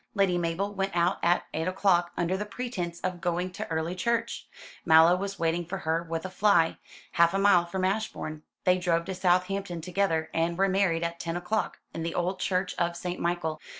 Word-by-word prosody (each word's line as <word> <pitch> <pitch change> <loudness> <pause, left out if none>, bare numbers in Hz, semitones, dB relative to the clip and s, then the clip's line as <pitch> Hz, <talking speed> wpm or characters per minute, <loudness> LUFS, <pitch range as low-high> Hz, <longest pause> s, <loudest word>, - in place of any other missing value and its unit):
Lady 195 -3 +3
Mabel 175 +4 -1
went 195 -2 -2
out 175 +2 +2
at 175 +1 +2
eight 160 +2 -2
o'clock, 185 -2 +2
under 175 +2 0
the 200 - -2
pretence 200 -6 -5
of 185 -1 -3
going 175 +1 -1
to - - -6
early 160 +1 -1
church. 230 +4 -2 0.4
Mallow 160 +1 +7
was 195 +1 -4
waiting 170 0 0
for 180 +4 -5
her 165 -2 -1
with 165 0 -4
a - - -3
fly, 185 -5 +3 0.3
half 170 +2 +3
a - - +3
mile 195 -3 +4
from 185 +2 -1
Ashbourne. 190 -6 -2 0.2
They 185 0 +3
drove 170 -2 +1
to 190 - -4
Southampton 185 0 0
together, 165 -2 -1
and 165 +1 0
were 195 +1 +3
married 185 -4 +1
at 170 0 -3
ten 165 0 -3
o'clock, 210 +5 -2
in 165 - -5
the 165 +1 -3
old 185 +2 -1
church 185 0 0
of 170 0 0
St. 180 +1 -4
Michael. 170 -3 -2
175 Hz, 200 wpm, -28 LUFS, 170-195 Hz, 0.4 s, Mallow